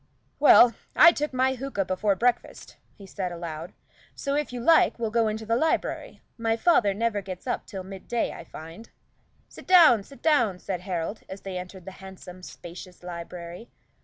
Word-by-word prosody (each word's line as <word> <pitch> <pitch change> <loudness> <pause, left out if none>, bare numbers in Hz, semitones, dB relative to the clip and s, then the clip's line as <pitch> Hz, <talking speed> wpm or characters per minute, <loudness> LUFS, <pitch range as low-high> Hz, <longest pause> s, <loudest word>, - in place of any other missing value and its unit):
"Well, 245 -4 +7 0.2
I 335 - +8
took 300 -2 -3
my 260 0 +1
hookah 260 -6 -3
before 195 +2 0
breakfast," 240 +3 -2 0.2
he 200 - -12
said 190 -1 -5
aloud, 170 0 -7 0.4
"so, 280 - -3
if 295 -1 -1
you 245 - -5
like, 320 +7 +4
we'll 225 -2 -3
go 230 0 +2
into 215 +1 -4
the 230 +1 +1
library. 315 +6 -1 0.2
My 225 0 0
father 230 - +3
never 220 -1 -1
gets 185 -2 -8
up 250 - -3
till 190 -3 -7
midday, 195 +5 -3
I - - -9
find." 165 +7 -11 0.6
"Sit - - -14
down, 325 - +7
sit 275 +7 -16
down," 240 - +2
said 180 -1 -5
Harold, 180 +2 -4
as 190 +1 -8
they 195 -1 -7
entered 180 0 -10
the 190 - -7
handsome, 185 -1 -11
spacious 180 0 -11
library. 175 +3 -8
205 Hz, 175 wpm, -26 LUFS, 180-245 Hz, 0.6 s, I